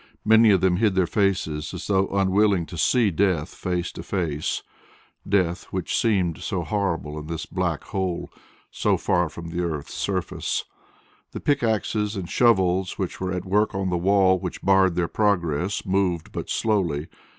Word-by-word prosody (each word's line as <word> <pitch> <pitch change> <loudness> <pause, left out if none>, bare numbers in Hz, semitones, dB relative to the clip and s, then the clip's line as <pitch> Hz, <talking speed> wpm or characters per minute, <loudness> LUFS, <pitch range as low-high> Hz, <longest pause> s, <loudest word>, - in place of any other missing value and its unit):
Many 110 +1 +6
of 95 -4 +4
them 90 -2 +3
hid 105 -2 +2
their 95 -1 +3
faces 85 -6 -1
as - - -6
though 95 -1 +2
unwilling 100 -1 +2
to 85 - -9
see 110 +5 +3
death 90 -2 0
face 90 -1 -3
to - - -8
face 80 -6 -2 0.7
death 90 -3 +1
which 95 -2 -3
seemed 95 -8 +1
so 95 -5 -2
horrible 85 -5 -2
in 75 - -9
this 80 0 -4
black 90 -4 -2
hole 95 -3 -3 0.4
so - - +1
far 90 -2 +1
from 85 +1 -8
the 85 +1 -2
earth's 80 -4 -4
surface. 95 -4 -2 0.7
The - - -4
pickaxes 110 -5 0
and 95 -3 -4
shovels 95 -3 +2
which 95 -1 -4
were 95 0 -1
at 90 0 -3
work 105 +2 +1
on 95 -1 -1
the - - +1
wall 95 0 +4
which - - -6
barred 95 -2 +4
their 90 -1 +1
progress 95 -3 0
moved 95 -4 0
but - - -5
slowly. 90 -9 0
95 Hz, 165 wpm, -24 LUFS, 85-100 Hz, 0.7 s, Many